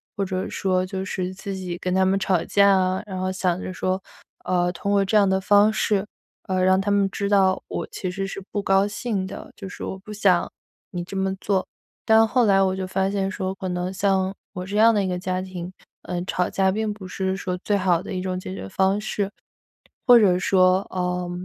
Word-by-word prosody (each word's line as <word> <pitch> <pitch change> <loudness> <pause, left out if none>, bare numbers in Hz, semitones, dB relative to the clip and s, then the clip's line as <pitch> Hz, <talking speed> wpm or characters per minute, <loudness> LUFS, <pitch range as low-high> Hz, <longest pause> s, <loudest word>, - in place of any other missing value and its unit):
或 200 - -1
者 185 0 -2
说 185 -1 0
就 190 0 -4
是 185 -1 -3
自 195 0 -6
己 180 -2 -5
跟 180 0 -2
他 190 0 +4
们 195 +1 +2
吵 185 -3 +1
架 200 0 +4
啊， 185 -1 +2
然 190 -2 -5
后 185 0 -1
想 185 -1 0
着 185 - -5
说， 185 +1 -1 0.4
呃， 180 -1 +1
通 200 +3 -3
过 200 -1 +4
这 210 +2 +2
样 200 -1 +5
的 190 0 +1
方 205 +2 +5
式， 210 -2 +1 0.4
呃， 185 -2 -1
让 190 +1 +4
他 200 +1 0
们 200 -1 +3
知 200 +1 -3
道 190 -2 +3
我 - - -4
其 185 -2 -4
实 195 +1 -3
是 195 - -6
不 205 - -1
高 195 +1 +3
兴 205 -3 -3
的， 190 - -9
就 195 - -8
是 - - -8
我 190 - -4
不 210 +3 -10
想 190 -4 +2 0.4
你 175 -1 -4
这 195 +2 -7
么 190 0 0
做。 195 -2 0 0.4
但 220 0 +6
后 245 0 +2
来 195 -1 +4
我 190 -1 +2
就 190 -1 -3
发 190 +1 0
现 195 -1 -1
说 190 -1 -3
可 190 - -5
能 180 +1 -2
像 190 0 +1 0.2
我 180 - -5
这 205 +2 -3
样 225 +1 +6
的 205 - +1
一 190 - -1
个 180 -1 -2
家 185 0 -2
庭， 185 -1 -7 0.3
呃， 175 0 -3
吵 180 -1 0
架 190 -1 +1
并 215 +1 -1
不 195 -3 -10
是 190 0 -2
说 180 -1 -3
最 205 - +2
好 185 -3 +2
的 - - -6
一 185 - -2
种 185 -1 -3
解 185 - -7
决 95 - -7
方 195 - +1
式， 205 -2 -2 0.8
或 245 -1 +9
者 185 -4 +4
说 185 0 +4
呃， 180 -1 -2
190 Hz, 245 characters per minute, -23 LUFS, 185-200 Hz, 0.8 s, 或